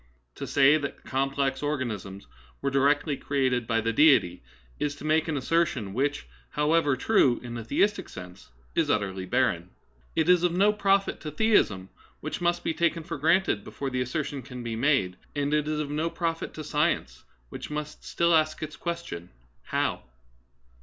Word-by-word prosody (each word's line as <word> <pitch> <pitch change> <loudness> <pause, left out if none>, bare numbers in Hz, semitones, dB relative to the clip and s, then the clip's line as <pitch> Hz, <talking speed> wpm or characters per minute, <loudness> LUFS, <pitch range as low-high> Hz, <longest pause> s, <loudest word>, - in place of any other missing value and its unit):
To - - -6
say 145 +2 +5
that 140 -2 -6
complex 135 0 -1
organisms 115 -10 -3 0.3
were 140 - -1
directly 140 +2 +2
created 130 -4 0
by 115 -1 +1
the 115 +1 -1
Deity 120 - +4 0.4
is 145 -1 -1
to 145 - -10
make 155 +1 +2
an 155 -3 -1
assertion 140 - 0
which, 145 +5 -1 0.2
however 150 -1 +2
true 130 - +3
in 120 -1 -6
a 115 - -5
theistic 200 - +1
sense, 90 -5 -11 0.2
is - - +1
utterly 95 -3 -1
barren. 100 -9 +1 0.5
It 160 0 +2
is 180 -1 +5
of 175 -1 +1
no 200 +4 +4
profit 195 -1 +1
to 155 - -5
theism, 150 - +2 0.3
which - - -5
must 175 0 +1
be - - 0
taken 170 0 0
for 145 - -6
granted 165 - +2
before 135 +5 -5
the 125 0 -1
assertion 140 +2 -3
can 125 0 -8
be 115 -1 -3
made; 115 -8 +1 0.2
and 145 0 0
it 150 0 +1
is 155 0 -1
of 145 -1 -3
no 155 +3 0
profit 165 -1 -3
to 155 - -6
science, 150 - -1 0.3
which - - -7
must 150 0 -5
still 170 0 +1
ask 155 -1 +2
its 155 0 -6
question, 170 - -5 0.2
" - - -39
How - - 0
145 Hz, 175 wpm, -27 LUFS, 120-160 Hz, 0.5 s, say